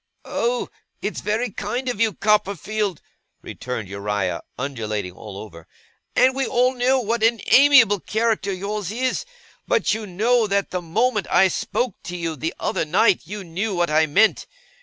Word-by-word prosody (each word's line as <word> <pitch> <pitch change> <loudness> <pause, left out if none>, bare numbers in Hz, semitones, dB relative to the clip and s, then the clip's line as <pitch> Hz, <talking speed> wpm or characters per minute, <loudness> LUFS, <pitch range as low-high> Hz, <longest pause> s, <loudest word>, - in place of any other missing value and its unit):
'Oh! 240 +1 -1 0.3
it's - - -3
very 220 +2 -1
kind 255 +6 -4
of 245 -4 -2
you, 220 -2 +3
Copperfield,' 210 -2 0 0.4
returned 120 -5 -5
Uriah, 100 -2 -2 0.2
undulating 110 -8 -3
all 100 +2 -10
over, 85 -6 -11 0.5
'and 260 +1 +5
we 270 0 -1
all 250 +1 +2
know 255 +1 +2
what 230 -1 -1
an 230 0 +3
amiable 260 -8 +7
character 220 0 0
yours 200 0 -4
is; 255 +3 -1 0.4
but - - +2
you 215 -1 -4
know 220 +5 +2
that 200 0 0
the 180 - -2
moment 210 +4 0
I 190 +2 +5
spoke 220 +3 -2
to 180 0 -5
you 165 -2 -3
the 160 +3 -4
other - - -1
night, 180 +5 +3
you 205 +1 -6
knew 185 +4 -3
what 175 -2 0
I 155 +1 +4
meant. 210 +9 +3
205 Hz, 160 wpm, -22 LUFS, 160-230 Hz, 0.5 s, amiable